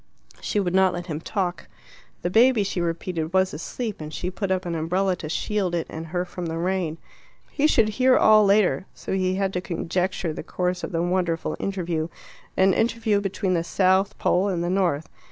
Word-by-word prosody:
She 210 - -1
would 180 -3 -1
not 190 -1 +4
let 175 0 -5
him 160 -3 -4
talk. 180 -2 -3 0.6
The 175 - -1
baby, 230 +1 +5
she 190 -2 -2
repeated, 165 0 -3
was 190 0 +3
asleep, 210 - -5
and 155 0 -6
she 180 +3 -3
put 195 +1 -3
up 185 -1 0
an 170 - -2
umbrella 180 +4 0
to 155 - -6
shield 190 +1 -1
it 165 - -1
and 160 +1 -6
her 175 +2 -2
from 175 -1 -6
the 165 0 -3
rain. 175 -2 -1 0.5
He 300 +1 +2
should 225 -7 +4
hear 255 +4 +4
all 215 0 +6
later, 200 -1 +3
so - - -5
he 185 -1 +1
had 195 0 -1
to 180 - -1
conjecture 180 -1 -2
the - - -5
course 180 0 -2
of - - -4
the 165 -1 0
wonderful 175 -2 0
interview 175 -5 -2 0.5
an 190 0 +5
interview 225 -2 +1
between 195 -1 -1
the 165 -2 +1
South 190 +2 +2
pole 185 +3 +2
and 175 -4 -1
the 175 - -1
North. 175 -6 +1
185 Hz, 200 wpm, -24 LUFS, 170-195 Hz, 0.6 s, all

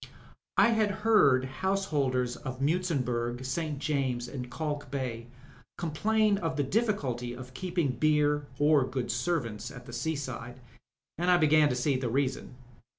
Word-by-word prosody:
I - - +6
had 220 -2 +2 0.2
heard 140 - +5
householders 135 -6 0
of 130 -1 -7
Muizenburg, 130 -6 -1
St. 155 +2 -2
James's, 135 -4 -2
«nd 125 -2 -5
Kalk 145 +1 -4
Bay 125 -4 -4 0.5
complain 210 +6 +1
of 165 -4 -2
t&e 145 - +1
difficulty 135 - -1
of 130 0 -10
keeping 175 -1 -1
beer 150 0 +2
or 145 -1 +4
good 130 -1 -3
servants 120 -5 -2
at 125 -2 -11
the 120 - -10
seaside, 130 -2 -4 0.6
and 175 +1 +1
I 180 - +6
began 155 -2 +5
to 125 - 0
see 130 +2 +1
the 130 -2 -2
reason. 130 0 -1
140 Hz, 145 wpm, -29 LUFS, 125-160 Hz, 0.6 s, I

